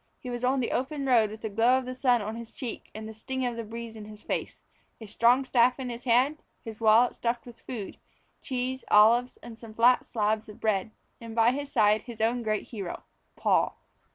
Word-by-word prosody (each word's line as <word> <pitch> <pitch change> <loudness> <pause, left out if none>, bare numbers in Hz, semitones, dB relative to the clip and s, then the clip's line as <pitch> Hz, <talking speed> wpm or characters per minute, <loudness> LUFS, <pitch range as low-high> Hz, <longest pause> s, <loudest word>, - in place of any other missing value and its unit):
He 250 - -7
was 240 0 -5
on 260 +1 +2
the 235 - -2
open 275 +2 -2
road 235 -5 +4
with 215 +1 -10
the 220 - -3
glow 230 +5 +3
of 260 - -3
the 255 - -5
sun 250 -3 +2
on 215 +2 -5
his 230 0 -9
cheek 250 -4 -7
and 220 0 -6
the 220 - -8
sting 260 +4 -4
of 240 -1 -2
the 230 - -4
breeze 230 +1 -8
in 215 -1 -9
his 210 0 -12
face; - - -4 0.4
a 225 - -9
strong 235 +5 +3
staff 250 0 +3
in 255 -2 -4
his 235 +1 -8
hand; 255 +5 +3
with - - -39
his 225 -1 -8
wallet 225 +2 +5
stuffed 240 0 -2
with 240 -1 -13
food 220 -6 -7 0.4
cheese, 260 0 -3
olives, 235 +4 +5
and 230 -1 -10
some 220 -2 -12
flat 245 +2 +5
slabs 215 -1 -1
of 210 - -12
bread; 215 -1 0 0.3
and 230 -1 -9
by 230 +1 +5
his 285 +2 -5
side 215 -3 +3
his 235 -2 -10
own 230 +2 +1
great 215 -2 -2
hero, 200 -7 -6 0.3
Paul. - - +1
235 Hz, 225 wpm, -28 LUFS, 220-250 Hz, 0.4 s, wallet